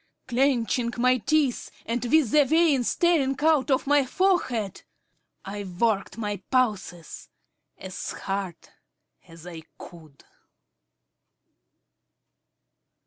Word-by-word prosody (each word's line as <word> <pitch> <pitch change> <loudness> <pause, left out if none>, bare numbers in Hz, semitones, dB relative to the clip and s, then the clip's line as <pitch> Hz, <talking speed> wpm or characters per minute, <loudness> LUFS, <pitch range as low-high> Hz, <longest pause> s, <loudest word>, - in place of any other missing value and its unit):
Clenching 245 -2 +1
my 255 +1 +3
teeth, 280 +2 0 0.2
and 235 +2 -2
with 260 -2 +3
the 300 -1 +6
veins 295 -3 +2
staring 310 -6 +2
out 310 -3 +3
on 265 -2 +3
my 290 0 +4
forehead, 260 - 0 0.6
I 205 +1 -5
worked 200 +3 -1
my 205 -2 -3
pulses 210 - -2 0.5
as 190 0 -7
hard 195 -3 -4 0.7
as 165 0 -14
I 170 -2 -8 0.2
could. 155 -5 -14
240 Hz, 95 wpm, -25 LUFS, 195-280 Hz, 0.7 s, the